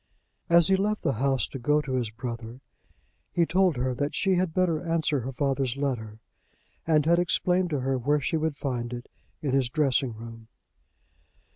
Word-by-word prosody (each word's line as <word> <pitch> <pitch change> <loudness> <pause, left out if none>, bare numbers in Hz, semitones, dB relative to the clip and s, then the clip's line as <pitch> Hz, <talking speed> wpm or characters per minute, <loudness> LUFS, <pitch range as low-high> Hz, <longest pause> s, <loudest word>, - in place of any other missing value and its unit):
As 170 -1 +6
he 190 - +5
left 210 +2 -1
the 135 - +1
house 135 -2 +2
to 135 - -7
go 150 +5 +2
to 145 -3 -5
his 125 -4 0
brother, 115 +1 -7 0.7
he 170 - +2
told 180 -2 +2
her 130 +1 0
that 145 +4 -2
she 195 -2 +2
had 180 -1 +1
better 170 -2 +1
answer 165 -4 0
her 130 +2 -4
father's 135 -1 -1
letter, 120 -7 -3 0.7
and 155 -2 +3
had 170 +2 +4
explained 180 +1 +1
to 145 -4 -1
her 135 0 0
where 145 +5 +2
she 145 - -1
would 155 -2 -1
find 125 -3 -3
it 120 0 -7 0.3
in 140 - 0
his 135 -3 +2
dressing 135 -3 +1
room. 115 0 -10
140 Hz, 180 wpm, -27 LUFS, 125-165 Hz, 0.7 s, As